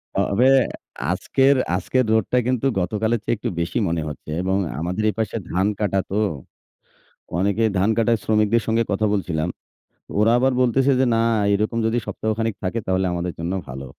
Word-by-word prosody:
তবে 110 +6 +2 0.6
আজকের 135 +9 +2 0.2
আজকের 130 +8 0
রোদটা 110 +3 +2
কিন্তু 130 0 0
গতকালের 110 +5 0
চেয়ে - - 0
একটু 105 - -4
বেশি 85 +8 -1
মনে 85 -1 -1
হচ্ছে 75 0 -8
এবং 95 +1 0 0.2
আমাদের 90 +6 -2
এপাশে 110 +1 -3
ধান 95 +2 +1
কাটা 100 -2 +1
তো। 100 - -2 1.2
অনেকে 100 +4 +1
ধান 95 +3 +2
কাটায় 115 0 +2
শ্রমিকদের 110 +1 +2
সঙ্গে 115 +1 +2
কথা 100 +2 +1
বলছিলাম। 85 -5 -1 0.7
ওরা 110 +2 +4
আবার 130 +1 +2
বলতেছে 130 +2 +3
যে, 130 - +4
না 115 - +2 0.3
এরকম 110 +3 0
যদি 115 +1 +1
সপ্তাহখানেক 110 0 -2
থাকে 95 +5 -1
তাহলে 95 0 +1
আমাদের 85 0 -3
জন্য 85 +2 -2
ভালো। 65 +1 -7
105 Hz, 160 wpm, -22 LUFS, 95-115 Hz, 1.2 s, ওরা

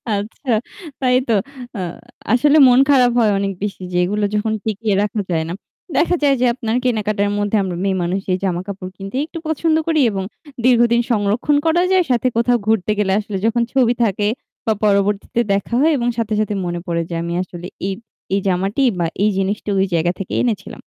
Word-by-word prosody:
আচ্ছা 220 +6 -4 0.5
তাই 250 -1 +3
তো। 230 - +2 0.4
আ - - -4 0.5
আসলে 290 +5 +4
মন 250 0 +5
খারাপ 255 -3 +5
হয় 220 -3 +4
অনেক 195 0 -1
বেশি 200 -2 -4
যে 175 - -1
এগুলো 205 +3 0
যখন 215 +1 0
টিকিয়ে 215 -1 -1
রাখা 210 0 -2
যায় 160 -1 +1
না। - - -3 0.4
দেখা 355 +1 +3
যায় 280 -1 +4
যে - - +4
আপনার 230 -2 -2
কেনাকাটার 215 -4 0
মধ্যে 205 +1 0
আমরা 185 -2 -3
মেয়েমানুষ 190 -1 0
এই - - +1
জামাকাপড় 185 +1 -3
কিনতে 195 +5 -7
একটু 330 +1 -9
পছন্দ 315 +1 +1
করি 320 -2 +2
এবং 195 -1 -3 0.4
দীর্ঘদিন 235 -1 +4
সংরক্ষণ 220 +7 +1
করা 345 +2 +3
যায় 375 -1 +4
সাথে 245 +1 +2
কোথাও 240 +1 +3
ঘুরতে 220 -2 +2
গেলে 195 -2 +1
আসলে 210 -2 -4
যখন 230 +1 +2
ছবি 250 -3 +3
থাকে 205 -1 0 0.4
তা 220 - +2
পরবর্তীতে 205 +2 +1
দেখা 200 +3 -2
হয় 320 - +4
এবং 240 -1 -1
সাথে, 225 -2 -1
সাথে 215 -1 0
মনে 175 0 -3
পড়ে 170 -1 0
যে 170 - -4
আমি 170 0 -3
আসলে 175 -1 -9 0.2
এই, 195 - -1 0.4
এই 200 - +3
জামাটি 195 +8 0 0.2
বা 170 - +1 0.2
এই 210 - +4
জিনিসটা 200 +2 -2
ওই 190 - +3
জায়গা 170 +1 +2
থেকে 195 - -5
এনেছিলাম। 215 -6 -2
210 Hz, 190 wpm, -19 LUFS, 195-245 Hz, 0.5 s, মন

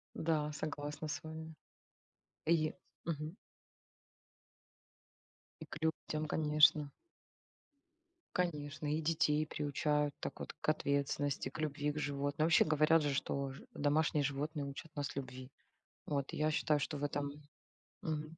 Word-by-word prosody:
Да, 155 -2 +1
согласна 150 0 -4
с 150 - -3
вами. 160 0 -7 0.9
И 160 -1 +4
е - - -9 0.3
Мгм. 155 +1 -3 2.2
И 160 - -7
к 145 - -7
людям, 155 -1 -1
конечно. 150 -1 +5 1.4
Конечно, 150 -4 -1
и 155 - +1
детей 155 -1 +2
приучают 150 0 0
так - - -5
вот - - -5
к - - -6
ответственности, 140 -1 +1
к - - -9
любви 150 -1 0
к 150 - -4
животным. 145 +2 0
Вообще 165 - +6
говорят 155 +1 +5
же, 145 -1 +1
что 140 0 -1
ж 135 - -10
домашние 150 0 +2
животные 145 +1 -1
учат 140 +3 -7
нас 145 -2 -2
любви. 130 -1 -6 0.6
Вот 140 -2 -1
я 155 +1 +1
считаю, 150 0 +3
что 145 +1 -2
в 145 - -5
этом 145 0 -1 0.7
Мгм. 155 0 -3
150 Hz, 130 wpm, -36 LUFS, 145-155 Hz, 2.2 s, Вообще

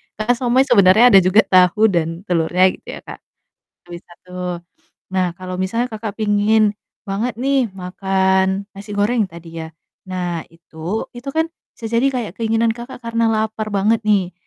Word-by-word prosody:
Karena 215 +3 0
siomay 250 +2 +2
sebenarnya 215 -3 +5
ada 195 - +9
juga 195 +4 +5
tahu 185 +4 +4
dan 165 0 -1
telurnya 180 +2 +3
gitu - - -28
ya, - - -9
Kak. - - -10 0.7
Nah, - - -19
bisa 175 0 -11
tuh. 180 0 -6 0.6
Nah, 185 -1 +1
kalau 185 -1 -7
misalnya 230 +6 -1
Kakak 215 -1 -5
pingin 210 0 +3 0.3
banget 210 +3 -3
nih 265 -2 +1
makan 190 +1 0
nasi 200 +1 -10
goreng 210 0 +1
tadi 165 -1 -10
ya. 160 - -8 0.4
Nah, 175 -3 -3
itu, 165 +4 -6
itu 255 +3 -8
kan 320 0 +2 0.3
bisa 225 - -7
jadi 235 +4 +3
kayak 235 -8 -3
keinginan 225 0 +1
Kakak 240 +1 -10
karena 230 0 0
lapar 220 0 -2
banget 215 +4 +2
nih. 190 -4 +2
205 Hz, 160 wpm, -19 LUFS, 185-225 Hz, 0.7 s, ada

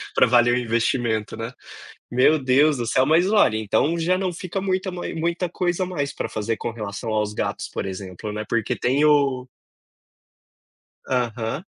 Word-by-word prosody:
para - - +5
valer 120 0 +4
o - - +2
investimento, 115 -2 0
né, 115 +2 -5 0.6
meu 130 +6 +4
Deus 140 +2 +3
do 120 - -2
céu. 130 +3 +3
Mas 160 +4 +4
Lori, 195 - +3
então 110 +10 +1
já 175 +3 +1
não 185 -1 -1
fica 185 +2 -4
muita 190 0 -1
mai 175 0 -5
muita 170 +2 -1
coisa 180 +1 -1
mais 145 -6 -3
para - - -4
fazer, 110 +1 -2
com 120 - -4
relação 110 0 -6
aos 105 -1 0
gatos, - - -3
por - - -4
exemplo, 95 +1 -6
não 105 +1 -4
é, - - -6
porque 115 -3 0
tem 135 +4 +1
o 140 -4 +3 1.6
Aham. 120 - -2
125 Hz, 175 wpm, -23 LUFS, 110-165 Hz, 1.6 s, para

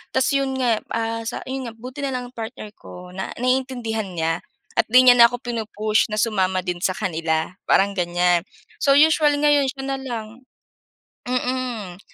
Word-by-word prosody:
Tapos 260 -1 +3
'yon 275 -1 0
nga, 245 -4 +1 0.2
ah, 230 0 -1
sa - - -4
'yon 265 -2 -4
nga, 230 - -7
buti 250 +5 -9
na 270 -2 -2
lang 250 -1 -5
ang - - -53
partner 225 -1 -7
ko 180 0 -11
na 190 +1 -5
naiintindihan 250 -4 -1
niya 165 0 -1 0.3
at - - +1
'di 255 +3 +6
niya 250 - +9
na 235 -1 +7
ako 245 - -4
pinu-push 220 -3 -1
na 215 - -3
sumama 190 -4 +1
din 175 -1 -3
sa 185 0 0
kanila, 160 -2 -1 0.2
parang 200 +1 +4
ganyan. 175 -1 +2 0.4
So, 275 0 +5
usually 300 -1 +4
ngayon 290 -2 +3
siya 270 0 -6
na 270 0 -2
lang. 240 0 -7 0.8
Mm, 250 -7 -3
235 Hz, 180 wpm, -22 LUFS, 195-260 Hz, 0.8 s, niya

